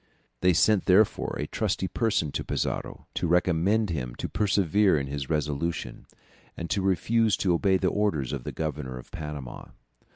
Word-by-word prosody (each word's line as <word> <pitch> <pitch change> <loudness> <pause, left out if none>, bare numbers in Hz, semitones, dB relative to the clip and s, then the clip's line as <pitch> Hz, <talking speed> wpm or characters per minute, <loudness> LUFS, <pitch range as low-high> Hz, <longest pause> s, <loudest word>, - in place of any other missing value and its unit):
They 90 +5 +4
sent 105 +3 +3
therefore 100 +3 +3
a - - -2
trusty 95 - -1
person 100 -9 0
to - - -3
Pizarro, - - -3
to - - -1
recommend 90 +4 +2
him 60 -6 -4
to - - -4
persevere 100 -2 +2
in 70 - -3
his 70 -1 -5
resolution, 75 +2 -2 0.5
and 85 -1 -5
to 100 - +1
refuse 105 +3 +2
to 90 -2 +1
obey 95 +3 +3
the 95 0 +1
orders 85 -12 0
of 70 -4 -4
the - - -5
Governor 75 -5 -4
of 65 - -12
Panama. 75 -6 -7
85 Hz, 165 wpm, -27 LUFS, 75-100 Hz, 0.5 s, They